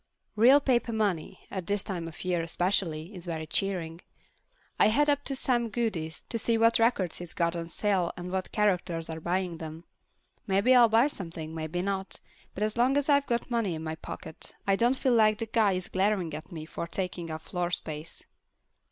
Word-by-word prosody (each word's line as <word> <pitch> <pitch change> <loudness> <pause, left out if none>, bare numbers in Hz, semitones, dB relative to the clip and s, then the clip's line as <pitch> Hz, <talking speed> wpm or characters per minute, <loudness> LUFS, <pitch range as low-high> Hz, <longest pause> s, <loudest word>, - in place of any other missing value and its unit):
Real 250 +6 +7
paper 250 -4 +1
money, 200 -7 -1
at 185 -3 -4
this 205 -1 0
time 175 -4 -4
of 165 +2 -9
year 180 -2 +1
especially, 170 0 -1
is 180 -2 -5
very 160 -2 -3
cheering. 170 -1 -2 0.8
I - - +7
head 290 +7 +4
up 285 0 0
to 275 - -1
Sam 240 -3 +1
Goody's 200 -9 -2
to 230 - -1
see 230 +1 +2
what 230 +1 +4
records 215 -7 +2
he's 175 -1 -7
got 170 0 +1
on 165 -1 -4
sale 185 0 0
and 180 0 -6
what 190 0 -2
characters 180 -6 0
are 160 - -5
buying 175 +1 -1
them. 160 +1 -7 0.6
Maybe 200 +6 +4
I'll 240 -2 +7
buy 230 +5 +5
something, 165 - -7
maybe 160 +2 -3
not, 195 -1 -2 0.4
but 205 - -1
as 215 +2 -1
long 255 +4 +3
as 285 +1 0
I've 280 -1 +4
got 240 +1 -1
money 225 -7 0
in 160 - -6
my 160 0 -3
pocket, 160 0 -8
I 195 - +3
don't 240 +5 +2
feel 260 -2 +2
like 215 -2 +5
the 225 - -2
guy 220 -3 +2
is 185 -1 -2
glaring 190 -3 0
at 155 - -7
me 160 -2 -6
for 170 - -5
taking 175 -1 -4
up 155 0 -5
floor 180 -2 -2
space. 155 -2 -5
190 Hz, 200 wpm, -29 LUFS, 165-225 Hz, 0.8 s, Real